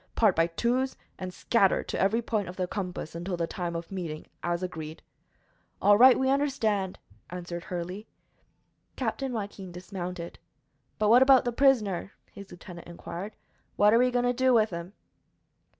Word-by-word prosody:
Part 215 Hz, -5 st, +4 dB
by 165 Hz, +1 st, +3 dB
twos, 245 Hz, +9 st, 0 dB, 0.2 s
and 185 Hz, -1 st, -5 dB
scatter 195 Hz, +1 st, +2 dB
to -, -, -4 dB
every 220 Hz, +5 st, +2 dB
point 210 Hz, -4 st, -1 dB
of 180 Hz, -, -8 dB
the 185 Hz, -, -1 dB
compass 180 Hz, -4 st, -5 dB
until 175 Hz, +2 st, -4 dB
the 170 Hz, -, 0 dB
time 170 Hz, 0 st, -4 dB
of 170 Hz, +2 st, -6 dB
meeting, 170 Hz, -5 st, -5 dB, 0.2 s
as 175 Hz, +1 st, -2 dB
agreed." 160 Hz, -3 st, -6 dB, 0.8 s
"All 205 Hz, -, +6 dB
right; 255 Hz, +4 st, +8 dB
we 265 Hz, -, +1 dB
understand," 230 Hz, -9 st, 0 dB, 0.3 s
answered 175 Hz, -1 st, -6 dB
Hurley. 180 Hz, +4 st, -5 dB, 0.9 s
Captain 270 Hz, -1 st, -2 dB
Joaquin 200 Hz, -4 st, -5 dB
dismounted. 180 Hz, -1 st, -6 dB, 0.6 s
"But, 210 Hz, -1 st, +2 dB
what 240 Hz, +3 st, +7 dB
about 265 Hz, -2 st, +6 dB
ther 245 Hz, -, 0 dB
prisoner?" 225 Hz, -8 st, +2 dB, 0.2 s
his 200 Hz, -1 st, -11 dB
lieutenant 175 Hz, -1 st, -11 dB
inquired. 175 Hz, +4 st, -7 dB, 0.4 s
"What 210 Hz, +1 st, +5 dB
are 230 Hz, -, +6 dB
we 250 Hz, +1 st, +4 dB
goin' 245 Hz, 0 st, +1 dB
to 245 Hz, -, +2 dB
do 260 Hz, 0 st, +3 dB
with 220 Hz, -2 st, +3 dB
him?" 170 Hz, +2 st, -6 dB
195 Hz, 165 wpm, -28 LUFS, 175-235 Hz, 0.9 s, right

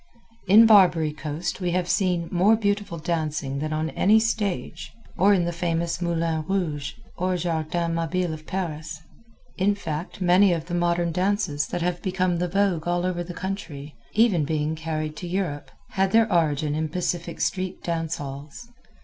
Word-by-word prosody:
In 215 Hz, +5 st, +8 dB
Barbary 180 Hz, -8 st, +5 dB
Coast 155 Hz, +5 st, -4 dB
we 180 Hz, -, 0 dB
have 180 Hz, -1 st, 0 dB
seen 175 Hz, -1 st, +1 dB
more 190 Hz, +5 st, +4 dB
beautiful 205 Hz, -4 st, -1 dB
dancing 155 Hz, -4 st, -2 dB
than 155 Hz, +1 st, -3 dB
on 155 Hz, +1 st, -1 dB
any 215 Hz, +3 st, +4 dB
stage, 215 Hz, -4 st, -2 dB, 0.2 s
or 200 Hz, +2 st, +4 dB
in 185 Hz, -4 st, +3 dB
the 175 Hz, -, -2 dB
famous 170 Hz, 0 st, -1 dB
Moulin 165 Hz, -2 st, 0 dB
Rouge, 155 Hz, -7 st, -2 dB, 0.2 s
or 185 Hz, 0 st, 0 dB
Jardin 165 Hz, 0 st, -1 dB
Mabile 165 Hz, +1 st, -1 dB
of 155 Hz, 0 st, -10 dB
Paris. 160 Hz, -4 st, -4 dB, 0.6 s
In 200 Hz, +2 st, +3 dB
fact, 165 Hz, -3 st, -5 dB
many 185 Hz, +1 st, +5 dB
of 165 Hz, -2 st, -3 dB
the 175 Hz, -, -7 dB
modern 175 Hz, 0 st, +1 dB
dances 180 Hz, -4 st, 0 dB
that 175 Hz, -, -3 dB
have 175 Hz, 0 st, -1 dB
become 185 Hz, -2 st, 0 dB
the 180 Hz, -, 0 dB
vogue 185 Hz, -3 st, +1 dB
all 175 Hz, 0 st, 0 dB
over 175 Hz, -1 st, -1 dB
the 175 Hz, 0 st, -8 dB
country, 165 Hz, -7 st, -5 dB, 0.2 s
even 210 Hz, -7 st, +3 dB
being 150 Hz, +1 st, -1 dB
carried 155 Hz, -1 st, -3 dB
to 175 Hz, -, -6 dB
Europe, 175 Hz, -5 st, -3 dB, 0.2 s
had 195 Hz, 0 st, 0 dB
their 225 Hz, 0 st, +5 dB
origin 150 Hz, -3 st, +1 dB
in 155 Hz, +1 st, -1 dB
Pacific 175 Hz, 0 st, -3 dB
street 185 Hz, -1 st, -2 dB
dance 165 Hz, -1 st, -2 dB
halls. 145 Hz, -, -8 dB
170 Hz, 165 wpm, -25 LUFS, 155-185 Hz, 0.6 s, In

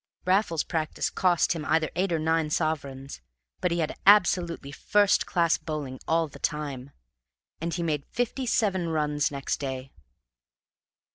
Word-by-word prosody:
Raffles's 185 Hz, -4 st, +2 dB
practice 160 Hz, -3 st, -2 dB
cost 180 Hz, -2 st, +2 dB
him 165 Hz, -3 st, -5 dB
either 160 Hz, 0 st, +1 dB
eight 185 Hz, +1 st, 0 dB
or 165 Hz, -, +2 dB
nine 160 Hz, 0 st, +1 dB
sovereigns; 140 Hz, -, -3 dB, 0.4 s
but 180 Hz, -, +1 dB
he 170 Hz, -, -1 dB
had 155 Hz, -, -2 dB
absolutely 175 Hz, -7 st, +4 dB
first 205 Hz, +6 st, +2 dB
class 170 Hz, -2 st, +2 dB
bowling 150 Hz, -5 st, -5 dB
all 165 Hz, 0 st, +2 dB
the -, -, -13 dB
time; 140 Hz, -3 st, -3 dB, 0.7 s
and 170 Hz, +1 st, -3 dB
he 170 Hz, -, -2 dB
made 150 Hz, -4 st, -2 dB
fifty 245 Hz, +2 st, -2 dB
seven 190 Hz, -7 st, +1 dB
runs 150 Hz, -2 st, 0 dB
next 140 Hz, -1 st, -3 dB
day. 135 Hz, -1 st, -5 dB
160 Hz, 145 wpm, -27 LUFS, 145-175 Hz, 0.7 s, absolutely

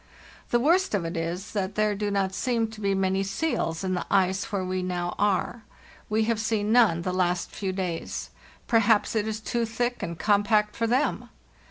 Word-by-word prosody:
The 240 Hz, -, +3 dB
worst 335 Hz, -, +3 dB
of 185 Hz, -4 st, -1 dB
it 165 Hz, +2 st, -4 dB
is 170 Hz, +4 st, -3 dB
that 200 Hz, -1 st, -2 dB
there 215 Hz, 0 st, +2 dB
do 205 Hz, 0 st, -2 dB
not 195 Hz, -1 st, 0 dB
seem 230 Hz, +1 st, 0 dB
to 215 Hz, -1 st, -10 dB
be 195 Hz, -1 st, +1 dB
many 190 Hz, 0 st, +1 dB
seals 195 Hz, -, -1 dB
in 185 Hz, -1 st, -1 dB
the 180 Hz, -, -3 dB
ice 190 Hz, -1 st, +1 dB
where 195 Hz, -2 st, -1 dB
we 185 Hz, 0 st, -2 dB
now 175 Hz, -1 st, -2 dB
are. 205 Hz, +3 st, +1 dB, 0.5 s
We 220 Hz, +1 st, +2 dB
have 225 Hz, 0 st, 0 dB
seen 215 Hz, -1 st, 0 dB
none 220 Hz, -9 st, +4 dB
the 185 Hz, -, -2 dB
last 180 Hz, -1 st, 0 dB
few 195 Hz, -2 st, -3 dB
days. 185 Hz, -3 st, -4 dB, 0.3 s
Perhaps 225 Hz, -2 st, +3 dB
it 215 Hz, -1 st, +1 dB
is 215 Hz, -1 st, -3 dB
too 235 Hz, +2 st, -1 dB
thick 240 Hz, +2 st, -2 dB
and 170 Hz, -1 st, -4 dB
compact 210 Hz, +1 st, +2 dB
for 230 Hz, -, 0 dB
them 255 Hz, +6 st, 0 dB
205 Hz, 195 wpm, -26 LUFS, 185-225 Hz, 0.5 s, none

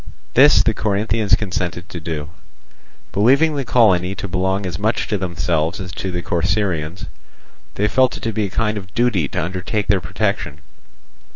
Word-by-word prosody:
This 145 Hz, +2 st, +6 dB
the 115 Hz, -, +2 dB
Corinthians 105 Hz, +1 st, +1 dB
consented 90 Hz, -3 st, -3 dB
to 85 Hz, -, -6 dB
do. 80 Hz, 0 st, -5 dB, 0.8 s
Believing 140 Hz, +10 st, +3 dB
the 140 Hz, -, -1 dB
colony 95 Hz, -7 st, +3 dB
to 100 Hz, +1 st, -5 dB
belong 95 Hz, +2 st, -1 dB
as 85 Hz, -2 st, -4 dB
much 110 Hz, +3 st, 0 dB
to 105 Hz, -, 0 dB
themselves 85 Hz, -2 st, -1 dB
as 95 Hz, -1 st, -6 dB
to 95 Hz, -, -4 dB
the 90 Hz, -1 st, -4 dB
Corcyraeans, 85 Hz, -1 st, -1 dB, 0.7 s
they 105 Hz, -, +1 dB
felt 130 Hz, +3 st, +2 dB
it -, -, -13 dB
to 115 Hz, -, -2 dB
be 105 Hz, 0 st, 0 dB
a -, -, -4 dB
kind 105 Hz, +1 st, -1 dB
of 95 Hz, -1 st, -14 dB
duty 115 Hz, -10 st, +2 dB
to -, -, -2 dB
undertake 95 Hz, +4 st, -3 dB
their 95 Hz, -2 st, +3 dB
protection. -, -, -2 dB
95 Hz, 170 wpm, -20 LUFS, 90-110 Hz, 0.8 s, This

